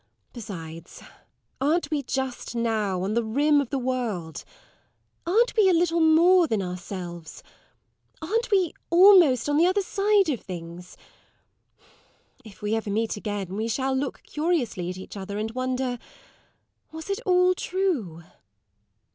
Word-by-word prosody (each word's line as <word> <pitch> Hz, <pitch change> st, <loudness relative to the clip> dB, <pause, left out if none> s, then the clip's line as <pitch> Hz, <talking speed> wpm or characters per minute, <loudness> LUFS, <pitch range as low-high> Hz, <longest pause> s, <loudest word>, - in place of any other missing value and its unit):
Besides, 165 Hz, -8 st, -9 dB, 0.6 s
aren't 320 Hz, +5 st, +1 dB
we 300 Hz, -2 st, 0 dB
just 265 Hz, -2 st, -4 dB
now 215 Hz, -6 st, -1 dB
on 200 Hz, +3 st, -2 dB
the 235 Hz, +1 st, +1 dB
rim 285 Hz, +6 st, +2 dB
of 270 Hz, -, -5 dB
the 275 Hz, -, -2 dB
world 240 Hz, -11 st, -3 dB, 0.8 s
aren't 455 Hz, +7 st, +2 dB
we 420 Hz, -4 st, +5 dB
a -, -, +4 dB
little 340 Hz, 0 st, +1 dB
more 335 Hz, +2 st, +5 dB
than 220 Hz, -6 st, 0 dB
ourselves 180 Hz, -2 st, -7 dB, 0.8 s
aren't 450 Hz, +10 st, -2 dB
we 380 Hz, -6 st, +2 dB, 0.2 s
almost 345 Hz, -, +6 dB
on 290 Hz, 0 st, +1 dB
the 335 Hz, +3 st, +5 dB
other 395 Hz, +2 st, +1 dB
side 400 Hz, 0 st, +2 dB
of 260 Hz, -6 st, -2 dB
things? 175 Hz, 0 st, -9 dB, 1.5 s
If 210 Hz, -2 st, -15 dB
we 210 Hz, +1 st, -1 dB
ever 225 Hz, -1 st, -2 dB
meet 220 Hz, +2 st, -1 dB
again, 205 Hz, -3 st, -5 dB
we 220 Hz, +2 st, -2 dB
shall 265 Hz, +3 st, -1 dB
look 265 Hz, +1 st, -3 dB
curiously 300 Hz, -, -2 dB
at 180 Hz, -, -6 dB
each 190 Hz, -, -10 dB
other, 200 Hz, +1 st, -6 dB
and 215 Hz, +1 st, -3 dB
wonder, 255 Hz, 0 st, -2 dB, 0.9 s
was 320 Hz, 0 st, -8 dB
it 395 Hz, -, -2 dB
all 365 Hz, -3 st, +3 dB
true? 315 Hz, -, -2 dB
255 Hz, 140 wpm, -25 LUFS, 205-340 Hz, 1.5 s, almost